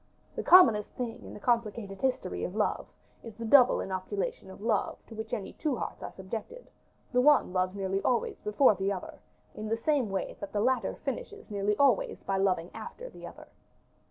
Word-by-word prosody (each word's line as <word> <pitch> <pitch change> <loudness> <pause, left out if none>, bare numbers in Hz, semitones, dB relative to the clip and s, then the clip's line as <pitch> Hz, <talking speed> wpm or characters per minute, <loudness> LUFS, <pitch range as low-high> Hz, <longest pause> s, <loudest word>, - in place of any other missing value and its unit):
The - - -2
commonest 230 - +7
thing 235 -2 -4
in - - -10
the - - -9
complicated 215 -4 -1
history 260 -1 -1
of - - -4
love, - - 0 0.3
is 230 -3 -10
the 230 +1 -6
double 250 +2 +6
inoculation 190 +1 -4
of 190 - -11
love 215 0 0
to - - -12
which 220 0 -6
any 200 - -4
two 300 -4 -1
hearts - - -5
are - - -6
subjected; 220 - -7 0.4
the 250 - +4
one 290 -8 +4
loves 185 +1 0
nearly 195 0 -1
always 240 +2 0
before 210 +4 +4
the 195 0 -1
other, 190 -2 -6 0.3
in 215 0 -6
the 225 - +1
same 265 -1 +1
way 195 -2 -3
that 200 - -7
the 205 - 0
latter 255 +4 +1
finishes 425 - -5
nearly 205 0 0
always 270 -6 +2
by 195 - -1
loving 185 -3 +1
after - - -8
the - - -10
other. - - -12
215 Hz, 190 wpm, -29 LUFS, 195-250 Hz, 0.4 s, commonest